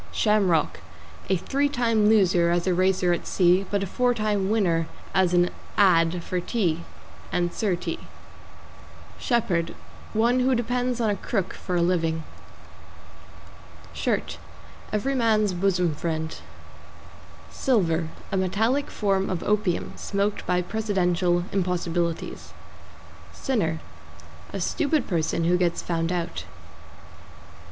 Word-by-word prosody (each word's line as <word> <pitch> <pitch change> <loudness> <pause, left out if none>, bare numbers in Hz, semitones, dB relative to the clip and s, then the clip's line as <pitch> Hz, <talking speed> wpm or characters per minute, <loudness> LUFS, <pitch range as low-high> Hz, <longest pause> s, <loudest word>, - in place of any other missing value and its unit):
=SHAMROCK= 195 -7 +2 0.5
A 190 - +3
three 280 +10 0
time 230 -6 +2
loser 185 -5 +4
as 175 0 +1
a 185 - +2
racer 185 0 +2
at 175 - -4
sea, 185 +1 +3
but 200 -1 0
a - - -1
four 245 +6 +1
time 210 -3 0
winner 175 -7 +1 0.3
as 185 -2 +3
an 175 0 +3 0.3
"ad." 175 -3 +4
for 180 - -2
tea 175 -4 0 0.5
and 175 -1 0
Sir 200 -5 0
T. 175 - -4 1.2
=SHEPHERD= 180 -9 0 0.4
One 235 +3 +3
who 255 +1 +3
depends 245 +1 -1
on 220 -3 +2
a - - 0
crook 195 -1 -2
for 180 - -4
a 170 - +3
living. 165 -2 0 1.7
=SHIRT= - - -2 0.5
Every 215 +6 0
man's 215 -5 +2
bosom 180 -2 +1
friend. 160 +1 -3 1.2
=SILVER= 170 -10 +1 0.2
A 195 - 0
metallic 220 +9 +1
form 195 -2 0
of 185 -3 -2
opium, 205 -4 0
smoked 200 +1 -2
by 180 0 +2
Presidential 180 -4 +1
impossibilities. 175 -3 -2 0.8
=SINNER= 165 -12 -1 0.7
A - - -4
stupid 300 -3 0
person 165 -2 0
who 175 +2 +3
gets 175 -2 0
found 165 0 -1
out. 175 -2 -3
185 Hz, 120 wpm, -25 LUFS, 175-215 Hz, 1.7 s, loser